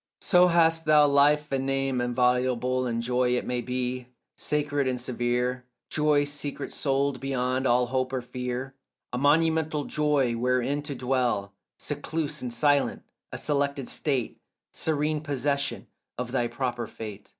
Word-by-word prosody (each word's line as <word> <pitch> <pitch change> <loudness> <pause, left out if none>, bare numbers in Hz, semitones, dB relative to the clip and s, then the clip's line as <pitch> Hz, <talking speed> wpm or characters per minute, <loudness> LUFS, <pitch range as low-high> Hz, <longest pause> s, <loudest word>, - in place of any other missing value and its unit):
So 180 -1 +5
hast 165 -1 +3
thou 150 -1 +6
life 145 +1 +3
and 135 0 -1
name 135 -2 0
inviolable 125 +1 +1
And 115 -1 -2
joy 125 0 +1
it - - -3
may 125 -1 -1
be, 125 0 -3 0.3
sacred 145 -2 -1
and 125 -1 -1
severe, 125 +1 -1 0.3
Joy 150 -1 +3
secret 145 -1 -3
souled 140 -1 0
beyond 130 -1 -1
all 125 +1 +3
hope 130 +1 -1
or 130 -2 -2
fear, 125 +1 -4 0.4
A 125 - -1
monumental 155 +1 +2
joy 145 -5 +1
wherein 125 +4 0
to 145 -1 -5
dwell 125 -6 0 0.2
Secluse 150 +1 -3
and 125 - -4
silent, 140 +4 +2 0.3
a - - -5
selected 140 -3 0
state, 135 -6 -1 0.3
Serene 150 -1 0
possession 140 -1 -1 0.3
of 125 0 -4
thy 120 -2 +1
proper 120 -2 -3
fate. 105 -2 -9
135 Hz, 140 wpm, -27 LUFS, 125-145 Hz, 0.4 s, thou